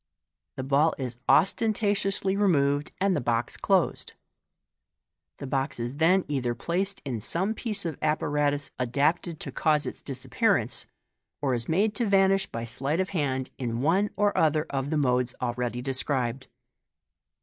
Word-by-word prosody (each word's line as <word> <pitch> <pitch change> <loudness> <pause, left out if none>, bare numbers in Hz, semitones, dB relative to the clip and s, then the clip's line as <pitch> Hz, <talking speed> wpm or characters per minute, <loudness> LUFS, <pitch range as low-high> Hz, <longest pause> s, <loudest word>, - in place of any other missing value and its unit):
The 130 - -4
ball 145 +4 +2
is 125 -3 -5
ost. 175 +6 +4
niatiously 200 -3 0
removed, 145 -8 +2
and 195 -1 +2
the 145 - -1
box 120 0 -1
closed. - - 0 1.2
The - - -7
ball 135 0 0
is 120 +3 -4
then 180 +4 +3
either 130 -5 -1
placed 190 - -1
in 120 -5 -3
some 185 - +1
piece 215 -4 0
of 160 -4 -4
apparatus 145 -1 0
adapted 145 +6 0
to 140 - -4
cause 150 +2 +2
its - - -6
disappearance, 130 - 0 0.5
or 135 -3 0
is 120 -1 -3
made 205 +6 +2
to 235 -3 0
vanish 195 0 +3
by 115 0 -5
sleight 135 +7 -1
of 190 0 0
hand 135 -7 -2
in 120 -2 -2
one 185 +8 +2
or 205 0 +1
other 155 0 +2
of 135 0 -2
the 155 - 0
modes 125 -3 +1
already 120 0 -2
de 135 0 -2
scribed. 130 -1 -1
145 Hz, 155 wpm, -27 LUFS, 130-190 Hz, 1.2 s, ost